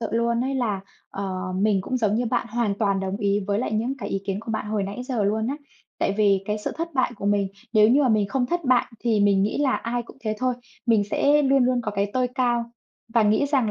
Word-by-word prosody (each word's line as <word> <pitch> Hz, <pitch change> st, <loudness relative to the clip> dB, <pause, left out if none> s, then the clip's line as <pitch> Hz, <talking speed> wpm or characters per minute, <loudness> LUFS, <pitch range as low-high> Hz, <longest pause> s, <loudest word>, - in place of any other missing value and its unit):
Sự 225 Hz, -, -1 dB
luôn 235 Hz, 0 st, +1 dB
ấy 270 Hz, +1 st, -2 dB
là, 220 Hz, -7 st, -1 dB, 0.3 s
ờ, 185 Hz, -1 st, -4 dB
mình 200 Hz, 0 st, +2 dB
cũng 255 Hz, +7 st, -2 dB
giống 215 Hz, -4 st, +1 dB
như 240 Hz, +2 st, 0 dB
bạn, 240 Hz, +1 st, 0 dB
hoàn 230 Hz, -4 st, 0 dB
toàn 200 Hz, -3 st, +1 dB
đồng 190 Hz, 0 st, -2 dB
ý 200 Hz, -1 st, +1 dB
với 200 Hz, 0 st, 0 dB
lại 230 Hz, -, -2 dB
những 235 Hz, +5 st, -1 dB
cái 265 Hz, -, -5 dB
ý 195 Hz, -, -2 dB
kiến 195 Hz, 0 st, -2 dB
của 225 Hz, -, -7 dB
bạn 220 Hz, -, -3 dB
hồi 210 Hz, -1 st, -1 dB
nãy 200 Hz, +5 st, -5 dB
giờ 250 Hz, -5 st, -1 dB
luôn 220 Hz, +2 st, 0 dB
á. 280 Hz, -, -2 dB, 0.4 s
Tại -, -, +1 dB
vì 200 Hz, -3 st, +3 dB
cái 210 Hz, 0 st, -1 dB
sự 210 Hz, -, -4 dB
thất 330 Hz, +1 st, -2 dB
bại 255 Hz, -2 st, +1 dB
của 200 Hz, -, -4 dB
mình, 205 Hz, -1 st, +2 dB, 0.2 s
nếu 215 Hz, -1 st, +6 dB
như 270 Hz, +5 st, +4 dB
mà 265 Hz, -, +3 dB
mình 215 Hz, -3 st, +2 dB
không 255 Hz, +2 st, 0 dB
thất 345 Hz, +3 st, -2 dB
bại 255 Hz, -2 st, +3 dB
thì 225 Hz, -3 st, +1 dB
mình 200 Hz, -1 st, +4 dB
nghĩ 205 Hz, -, -1 dB
là 285 Hz, -3 st, +2 dB
ai 240 Hz, +1 st, -3 dB
cũng 235 Hz, -, -15 dB
thế 215 Hz, -3 st, -2 dB
thôi. 255 Hz, 0 st, 0 dB, 0.3 s
Mình 225 Hz, -3 st, +4 dB
sẽ 295 Hz, +1 st, +3 dB
luôn 270 Hz, -2 st, +4 dB
luôn 250 Hz, 0 st, +2 dB
có 215 Hz, -, -2 dB
cái 200 Hz, 0 st, -1 dB
tôi 255 Hz, -1 st, +1 dB
cao 240 Hz, -3 st, +1 dB, 0.5 s
và 230 Hz, -, +5 dB
nghĩ 215 Hz, +7 st, +3 dB
rằng 265 Hz, -6 st, +1 dB
220 Hz, 265 wpm, -24 LUFS, 205-250 Hz, 0.5 s, nếu